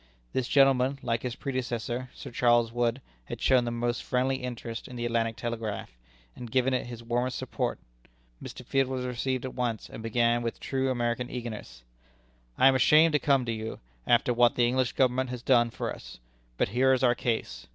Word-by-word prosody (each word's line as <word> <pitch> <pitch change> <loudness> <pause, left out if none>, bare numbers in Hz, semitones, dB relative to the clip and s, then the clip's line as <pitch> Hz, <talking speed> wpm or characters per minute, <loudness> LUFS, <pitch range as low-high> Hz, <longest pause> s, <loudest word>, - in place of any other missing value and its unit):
This 130 -2 -1
gentleman, 135 -1 +4
like 115 -1 -1
his 125 -2 -4
predecessor, 125 -2 -3
Sir 135 - -9
Charles 120 -1 +3
Wood, 120 +2 0 0.2
had - - -7
shown 130 -2 +3
the - - -1
most 120 0 -1
friendly 130 +1 0
interest 120 -2 -6
in 125 - -10
the 120 0 -3
Atlantic 115 -1 0
Telegraph, 115 -4 -4 0.4
and 120 - -8
given 130 +2 +2
it 125 - -1
his 120 -1 -8
warmest 120 +2 -1
support. - - -2 0.6
Mr. - - -9
Field 135 -1 +1
was 130 -1 -3
received 125 +1 -2
at 130 - -5
once, 120 -3 -3
and - - -8
began 120 +1 +1
with 115 -1 -4
true 135 0 -1
American 120 0 -1
eagerness: 110 - -7 0.7
"I 130 - +6
am 135 - +6
ashamed 155 +5 +5
to 150 - +3
come 135 -3 +2
to 115 - -2
you, 110 0 -5 0.3
after 120 +1 +3
what 120 0 +4
the 120 - +3
English 130 0 0
Government 130 0 +1
has 125 -1 -6
done 120 -3 +4
for - - -4
us. - - -11 0.4
But - - +1
here 130 +5 +3
is 130 - 0
our 120 -1 +5
case. 120 -2 -3
120 Hz, 195 wpm, -28 LUFS, 120-130 Hz, 0.7 s, I